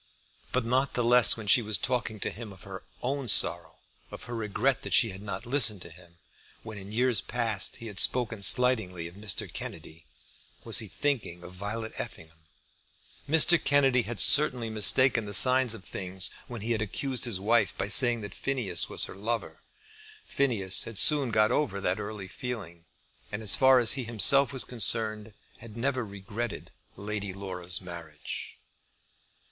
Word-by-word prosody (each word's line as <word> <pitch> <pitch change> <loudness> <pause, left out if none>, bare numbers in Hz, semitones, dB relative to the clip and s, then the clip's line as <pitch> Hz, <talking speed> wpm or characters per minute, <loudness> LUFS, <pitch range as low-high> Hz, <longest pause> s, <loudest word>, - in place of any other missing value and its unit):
But 130 -2 -2
not 130 +3 -1
the 120 - -1
less 120 -1 +5
when 110 - -8
she 105 +5 +4
was 110 -1 -1
talking 125 -4 -3
to - - -3
him 110 -1 -10
of 95 -2 -16
her 95 -1 -10 0.2
own 135 +1 -3
sorrow, 85 -5 +3 0.3
of - - -11
her 120 - -9
regret 115 +5 -2
that - - -2
she 115 -4 +2
had 95 +1 -10
not 105 +3 -7
listened 115 -7 +1
to - - -13
him 85 0 -17 0.5
when 110 -2 -9
in 100 +1 -11
years 125 +1 0
past 115 -4 -4
he 115 - -12
had 105 -3 -6
spoken 115 -4 +1
slightingly 100 -7 +2
of 85 - -13
Mr. 100 0 -4
Kennedy, 80 +1 -10 0.6
was - - +2
he - - -7
thinking 115 -12 -3
of 90 - -12
Violet 105 +4 -7
Effingham. 80 0 -10 0.8
Mr. 160 +2 +5
Kennedy 135 -3 +2
had 115 -2 -7
certainly 125 0 +4
mistaken 115 +2 +2
the 105 -1 -1
signs 130 -2 +5
of 95 - -12
things 95 0 -3 0.2
when 120 -3 -8
he 115 +3 -4
had 110 -2 -1
accused 130 +5 -2
his 110 -6 -1
wife 105 -1 0
by - - -3
saying 120 +1 +6
that 100 0 -9
Phineas 120 -11 -1
was - - +1
her - - -11
lover. 115 +4 -5 0.6
Phineas 100 -9 0
had 115 -3 -6
soon 140 +5 +7
got 110 -1 +1
over 115 -10 -2
that 95 -1 -2
early 105 -2 -8
feeling; 95 -6 -8 0.5
and 105 +1 -6
as 100 - +5
far 130 -1 +4
as 120 -3 +2
he 130 -1 -1
himself 120 +4 +3
was 130 -2 -1
concerned 110 -2 -2 0.2
had 115 -1 -13
never 130 +1 -2
regretted 105 +3 -8 0.2
Lady 100 -1 -6
Laura's 90 -3 +1
marriage. 85 -5 -9
110 Hz, 175 wpm, -27 LUFS, 95-125 Hz, 0.8 s, soon